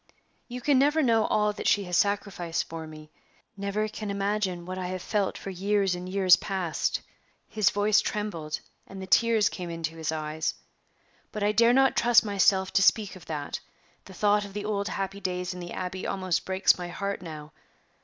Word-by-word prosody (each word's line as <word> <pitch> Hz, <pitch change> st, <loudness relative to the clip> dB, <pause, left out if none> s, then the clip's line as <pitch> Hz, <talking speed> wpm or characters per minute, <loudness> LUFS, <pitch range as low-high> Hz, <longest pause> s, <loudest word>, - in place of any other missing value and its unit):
"You 250 Hz, 0 st, -7 dB
never 290 Hz, +4 st, +4 dB
can -, -, +2 dB
know 225 Hz, -2 st, +3 dB
all 210 Hz, 0 st, +2 dB
that -, -, -4 dB
she 205 Hz, -, +3 dB
has 180 Hz, -2 st, -3 dB
sacrificed 200 Hz, -4 st, 0 dB
for 160 Hz, -1 st, -7 dB
me 155 Hz, 0 st, -12 dB, 0.4 s
never 200 Hz, +2 st, -2 dB
can 215 Hz, -1 st, -6 dB
imagine 200 Hz, -3 st, -1 dB
what 185 Hz, +1 st, -5 dB
I 180 Hz, -, -3 dB
have 185 Hz, 0 st, -4 dB
felt 205 Hz, -3 st, -1 dB
for 195 Hz, -, -6 dB
years 195 Hz, +1 st, +1 dB
and 180 Hz, +1 st, -6 dB
years 185 Hz, -1 st, +6 dB
past" 185 Hz, -5 st, -2 dB, 0.5 s
his 215 Hz, -4 st, +2 dB
voice 205 Hz, +1 st, +3 dB
trembled, 170 Hz, -8 st, -3 dB, 0.3 s
and 195 Hz, -, -9 dB
the 190 Hz, -, -6 dB
tears 225 Hz, +2 st, +4 dB
came 180 Hz, -2 st, -5 dB
into 165 Hz, -1 st, -4 dB
his 160 Hz, -1 st, -2 dB
eyes 155 Hz, 0 st, -2 dB, 0.8 s
"but 210 Hz, -2 st, -4 dB
I 205 Hz, -, +3 dB
dare 230 Hz, +2 st, +4 dB
not 270 Hz, +1 st, +4 dB
trust 235 Hz, -1 st, +5 dB
myself 195 Hz, -2 st, +2 dB
to -, -, +4 dB
speak 205 Hz, 0 st, +3 dB
of 180 Hz, -2 st, -14 dB
that; 150 Hz, -3 st, -4 dB, 0.5 s
the 190 Hz, -, -12 dB
thought 205 Hz, +2 st, +3 dB
of 200 Hz, -1 st, -9 dB
the 205 Hz, 0 st, -4 dB
old 200 Hz, -1 st, -1 dB
happy 195 Hz, 0 st, -3 dB
days 180 Hz, -1 st, -3 dB
in 180 Hz, -, -8 dB
the 175 Hz, -1 st, -7 dB
Abbey 185 Hz, 0 st, -4 dB
almost 185 Hz, -3 st, -1 dB
breaks 190 Hz, 0 st, +3 dB
my 175 Hz, -, -4 dB
heart 200 Hz, +2 st, -4 dB
now. 155 Hz, -3 st, -9 dB
195 Hz, 195 wpm, -27 LUFS, 180-210 Hz, 0.8 s, years